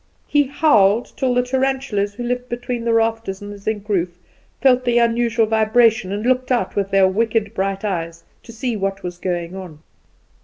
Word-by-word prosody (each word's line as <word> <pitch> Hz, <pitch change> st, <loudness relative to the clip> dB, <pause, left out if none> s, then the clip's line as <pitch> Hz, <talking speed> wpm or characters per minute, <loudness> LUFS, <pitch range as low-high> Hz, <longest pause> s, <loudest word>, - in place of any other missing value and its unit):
He 290 Hz, -2 st, +2 dB
howled, 235 Hz, -7 st, +3 dB
till 255 Hz, -2 st, 0 dB
the 250 Hz, -, +3 dB
tarantulas, 260 Hz, -6 st, -1 dB
who 240 Hz, -, -5 dB
lived 245 Hz, +1 st, -3 dB
between 240 Hz, 0 st, -4 dB
the 230 Hz, -, +2 dB
rafters 225 Hz, -3 st, 0 dB
and 205 Hz, 0 st, -8 dB
the 205 Hz, -, -11 dB
zinc 210 Hz, 0 st, -4 dB
roof, 185 Hz, -4 st, 0 dB, 0.5 s
felt 255 Hz, 0 st, +4 dB
the 240 Hz, -1 st, +1 dB
unusual 235 Hz, -1 st, +2 dB
vibration, 220 Hz, -1 st, +2 dB
and 205 Hz, +3 st, -3 dB
looked 255 Hz, 0 st, +1 dB
out 235 Hz, -7 st, 0 dB
with 200 Hz, -1 st, -1 dB
their 195 Hz, -1 st, +4 dB
wicked 220 Hz, +1 st, 0 dB
bright 195 Hz, 0 st, -2 dB
eyes, 165 Hz, -4 st, -3 dB, 0.2 s
to -, -, -13 dB
see 235 Hz, +1 st, -3 dB
what 195 Hz, -1 st, -3 dB
was 175 Hz, -1 st, -6 dB
going 175 Hz, -1 st, -3 dB
on. 170 Hz, -5 st, -10 dB
220 Hz, 185 wpm, -20 LUFS, 195-245 Hz, 0.5 s, felt